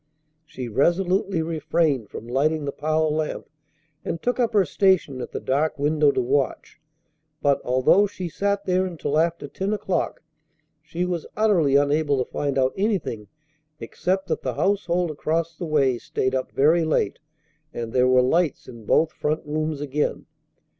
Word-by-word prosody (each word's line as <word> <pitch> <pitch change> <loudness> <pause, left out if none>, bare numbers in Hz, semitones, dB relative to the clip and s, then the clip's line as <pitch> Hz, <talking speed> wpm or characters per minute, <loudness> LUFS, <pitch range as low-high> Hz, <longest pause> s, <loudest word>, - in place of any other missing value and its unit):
She 130 -2 -6
resolutely 175 - +1
refrained 155 - 0
from 115 - -8
lighting 145 +5 0
the 140 - -2
parlor 155 +1 0
lamp, 155 -1 -3 0.6
and 165 - -3
took 245 +5 -1
up 240 -2 +2
her 200 -3 +4
station 165 -6 +1
at - - -6
the - - -4
dark 145 +4 0
window 150 0 +3
to - - 0
watch; 135 +4 -1 0.6
but, 140 -1 +2
although 130 +11 +4
she 185 -2 -6
sat 200 +4 -1
there 185 0 +2
until 155 -3 -1
after 165 -2 0
ten 195 +8 -3
o'clock, 195 -6 -2 0.6
she 165 +3 -3
was 175 -3 -3
utterly 185 -11 +3
unable 145 0 +2
to 130 - -3
find 140 -2 -2
out 130 0 +2
anything 190 - -2 0.5
except 190 +3 -2
that - - -1
the - - -3
household 180 -4 0
across 160 +2 -2
the 170 - -5
way 135 -5 +2
stayed 130 0 -2
up 130 -1 -2
very 160 +5 +3
late 155 - 0 0.5
and 115 -5 -5
there 125 0 +4
were 130 0 +5
lights 160 +3 +1
in 115 -3 -11
both 160 0 +3
front 155 +1 -2
rooms 155 0 -2
again. 145 +1 -2
155 Hz, 160 wpm, -24 LUFS, 140-180 Hz, 0.6 s, were